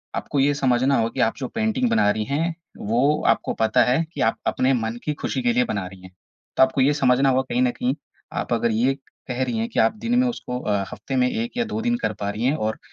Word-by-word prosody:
आपको 145 - -2
ये 140 +2 +3
समझना 135 -1 +2
हो 115 0 +1
कि - - -8
आप 115 - -4
जो 130 - -4
पेंटिंग 225 - 0
बना 230 - +3
रही 110 +1 -1
हैं 165 +4 0 0.2
वो 115 +3 -1 0.3
आपको - - -5
पता 110 -1 +4
है 130 +7 +2
कि - - -4
आप - - -6
अपने 130 +1 +2
मन 110 +1 -3
की 150 - -1
ख़ुशी - - -2
के 245 -1 +2
लिए 250 +1 +3
बना 100 -3 -2
रही 95 0 -13
हैं। 95 0 -13 0.5
तो - - +7
आपको 130 +1 +2
ये 140 +3 +4
समझना 135 -1 +3
होगा 130 0 +3
कहीं 120 +1 +1
न 125 -1 +3
कहीं 125 +2 -1 0.4
आप - - -2
अगर 115 0 +1
ये 120 +5 +2 0.3
कह 130 0 -1
रही 125 -3 -2
हैं 115 +1 -1
कि - - -2
आप 110 - +3
दिन 240 +1 +2
में 255 - +3
उसको 125 - -4
अ, 105 -5 0
हफ़्ते 135 - -5
में 125 -1 +3
1 235 +2 -3
या 240 - +2
2 220 - -1
दिन 240 +1 +1
कर - - 0
पा 100 - -2
रही 105 +3 -4
हैं 135 +4 +2
और 110 - -3
130 Hz, 265 wpm, -23 LUFS, 115-150 Hz, 0.5 s, तो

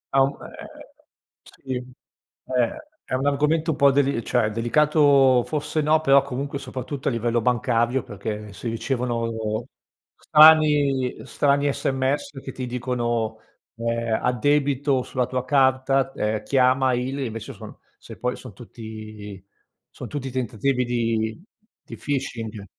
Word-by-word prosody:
Ha 135 - +6
mhmm, 140 - -4
è - - -12
è - - -13 0.5
Sì. 130 -1 -8 0.7
Eh, 125 - 0 0.3
è - - -7
un 130 +2 -1
argomento 150 +3 +1
un 145 - -4
po' 140 -1 +5
deli 140 -4 +1
cioè, 115 -4 +1
delicato 135 +1 +4
forse, 150 0 -2
no, 155 +1 +3
però 140 -2 +5
comunque 140 +2 -4
soprattutto 130 +1 -6
a - - +3
livello 115 0 0
bancario 120 +1 +1
perché 105 +1 -6
si 115 +5 -5
ricevono 115 -2 -2 0.5
strani 150 -4 +5
strani 140 0 +1
sms 135 +1 -1
che 130 - -6
ti 130 -1 -6
dicono, 120 -3 -2 0.4
uhm: 115 -1 -1
"Addebito 140 +1 +1
sulla 125 -1 -1
tua 125 0 -3
carta, 135 0 +2
ehm, 105 0 -2
chiama 130 0 +3
il" 125 +3 -2
e 135 - -2
invece 115 -2 -6
son - - -11 0.2
se - - -12
poi - - -2
son - - -11
tutti 110 -3 -10 0.5
son - - -9
tutti 135 -3 -5
tentativi 125 +1 -1
di 115 +3 -1 0.4
di 115 - -10
phishing. 115 -5 -4
130 Hz, 135 wpm, -23 LUFS, 115-140 Hz, 0.7 s, Ha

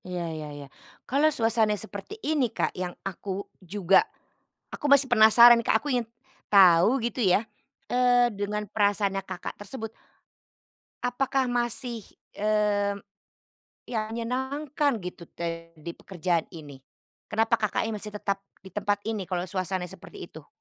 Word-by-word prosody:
Iya 180 -1 -4
iya 155 -1 -6
iya. 145 - -8 0.4
Kalau 285 +4 +3
suasananya 225 -6 +2
seperti 215 - -6
ini 295 -6 +1
Kak, - - -2
yang 180 -1 -4
aku 195 +1 -5 0.2
juga 190 0 +3 0.7
aku - - -10
masih 280 -1 +7
penasaran 235 0 +8
nih - - -14
Kak, 220 - +5
aku 285 +2 -2
ingin 240 -2 0 0.4
tahu 190 +4 +6
gitu 240 +1 -2
ya, 200 +2 +3 0.4
eee, 245 0 +4
dengan 210 +1 -3
perasaannya 200 -1 +1
Kakak 185 -2 -7
tersebut. 225 +1 -6 1.1
Apakah 265 +2 0
masih, 240 -1 -2 0.3
mmm, 205 -1 0 0.8
ya 235 - -3
menyenangkan 265 +5 -1
gitu 175 -1 -8
te 165 0 -6
di 160 +2 -7
pekerjaan 175 -2 -2
ini? 145 -6 -11 0.5
Kenapa 225 +1 +1
Kakaknya 220 +1 -1
masih 210 0 -6
tetap 200 -1 -2 0.2
di 190 - -12
tempat 205 0 0
ini 215 -4 -3
kalau 180 -1 -2
suasananya 185 -1 -3
seperti - - -10
itu? - - -13
210 Hz, 135 wpm, -27 LUFS, 185-240 Hz, 1.1 s, penasaran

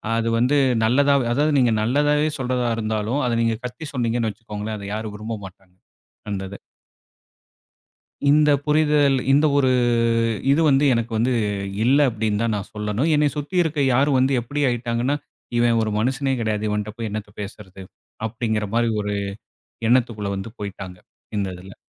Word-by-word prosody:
அது 115 0 0
வந்து 130 +5 +3 0.3
நல்லதா, 140 +5 +3 0.2
அதாவது 150 +4 +2
நீங்க 120 -3 +3
நல்லதாவே 145 +5 +2
சொல்றதா 125 -1 0
இருந்தாலும், 110 +5 -1
அத - - 0
நீங்க 115 -1 0
கத்தி 150 +5 -7
சொன்னீங்கன்னு 115 -3 0
வச்சுக்கோங்களேன், 105 0 -6
அத 100 - -7
யாரும் 110 -1 -5
விரும்ப 110 +1 -5
மாட்டாங்க. 95 -1 -15 0.6
அந்தத. 95 0 -4 1.8
இந்த 150 +1 +5
புரிதல் 150 -2 +3 0.2
இந்த 145 +3 +4
ஒரு 130 -2 +3 0.8
இது 150 - +3
வந்து, 140 +1 +3
எனக்கு 115 0 -2
வந்து 125 +3 +2 0.5
இல்ல, 135 +4 +4
அப்படினு 110 -1 -1
தான் 115 -2 0
நான் 100 - -6
சொல்லணும். 105 +8 -1
என்னைய 150 -1 +2
சுத்தி 150 +5 -4
இருக்க, 160 -2 -3 0.2
யாரு 140 +4 +3
வந்து 130 +2 +2
எப்படி 145 +5 -3
ஆயிட்டாங்கன்னா, 120 +3 -1 0.4
"இவன் 120 -1 +3
ஒரு 110 -1 -1
மனுசனே 130 +4 0
கிடையாது. 110 -1 -1
இவன்ட்ட 105 0 -2
போய் 115 -1 -4
என்னத்த 105 0 -6
பேசறது?" 95 -2 -9 0.4
அப்படிங்கற 110 -1 -2
மாரி, 115 -1 +2
ஒரு 105 0 -2 0.7
எண்ணத்துக்குள்ள 115 -4 +1
வந்து 95 +3 -6
போய்ட்டாங்க. 95 -2 -7 0.4
இந்த 100 -1 -1
இதில. 95 +2 -12
115 Hz, 150 wpm, -22 LUFS, 105-135 Hz, 1.8 s, இந்த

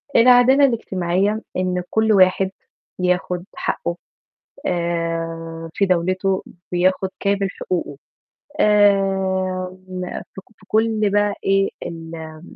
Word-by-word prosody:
العدالة 250 +3 +6
الاجتماعية 200 -3 0 0.2
إن 180 -1 -1
كل 220 0 +2
واحد 190 0 +4 0.5
ياخُد 180 0 0
حقّه 170 - -2 0.7
آآ، 165 -1 -3
في 200 - +2
دَولته 185 +1 +1 0.3
بياخُد 185 +2 +2
كامل 200 -1 +1
حقوقه. 175 -7 -4 0.6
آآ، 190 -3 +2
م 185 0 -5 0.3
في - - -7
ك - - -31
في 190 - -22
كل 220 -2 +2
بقى 205 0 +2
إيه 195 0 +2
ال 160 -1 -8
185 Hz, 105 wpm, -21 LUFS, 175-200 Hz, 0.7 s, العدالة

